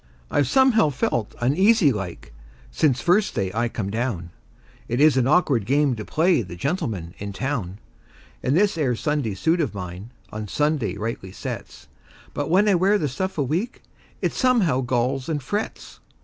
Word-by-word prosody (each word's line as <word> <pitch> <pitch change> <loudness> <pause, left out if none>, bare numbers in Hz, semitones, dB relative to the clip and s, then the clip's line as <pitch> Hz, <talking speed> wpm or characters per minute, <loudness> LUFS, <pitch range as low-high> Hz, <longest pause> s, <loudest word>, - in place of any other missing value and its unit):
I've 145 -3 +2
somehow 250 - +4
felt 120 -5 -2
uneasy 175 - +4
like, 95 - -6 0.4
since 135 -6 +1
first 190 - +2
day 95 -2 -1
I 115 +2 0
come 100 -4 -4
down; 110 -7 -3 0.6
It 120 +2 -1
is 150 -2 +6
an 130 -1 +2
awkward 140 - +2
game 140 -1 +2
to 110 - -6
play 165 - +2
the 90 -4 -8
gentleman 110 - -3
in 100 0 -5
town; 110 -7 -3 0.6
And 135 +5 +1
this 200 -4 +2
'ere 130 -5 +1
Sunday 145 -6 -1
suit 160 - +1
of 120 -10 -2
mine 90 +3 -7 0.2
on 110 0 -5
Sunday 150 -3 0
rightly 105 -3 -5
sets; - - -7 0.5
But 145 - -3
when 190 +5 +4
I 205 - +5
wear 190 +4 +3
the 155 - -1
stuff 185 +9 -3
a 145 - +2
week, 175 - -3 0.4
it - - +1
somehow 220 - +2
galls 130 +3 -1
and 155 -2 0
frets. 205 - -5
135 Hz, 170 wpm, -23 LUFS, 110-165 Hz, 0.6 s, is